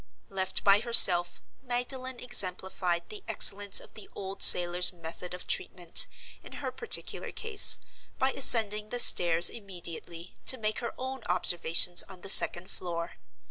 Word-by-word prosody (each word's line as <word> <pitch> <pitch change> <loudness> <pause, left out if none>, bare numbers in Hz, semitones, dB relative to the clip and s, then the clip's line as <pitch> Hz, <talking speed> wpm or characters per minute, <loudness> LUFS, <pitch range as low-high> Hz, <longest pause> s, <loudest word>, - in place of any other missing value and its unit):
Left 190 -1 -5
by 200 0 +3
herself, 185 -7 +3 0.2
Magdalen 255 0 -5
exemplified 185 -6 -4
the 210 - -12
excellence 200 0 0
of - - -17
the 215 - -15
old 195 0 -10
sailor's 175 0 +5
method 175 +1 -11
of 180 - -14
treatment, 175 -2 -1 0.3
in - - -16
her - - -8
particular 460 -1 -2
case, 440 -2 +3 0.4
by 265 +1 -2
ascending 215 -6 +1
the 245 - -6
stairs 170 -7 +5
immediately, 175 -4 -8
to 260 - +3
make 215 -2 -5
her 235 - -9
own 260 0 -9
observations 175 -1 0
on 185 -2 -14
the 195 - -8
second 185 -1 +5
floor. 170 -2 -8
195 Hz, 140 wpm, -26 LUFS, 175-240 Hz, 0.4 s, sailor's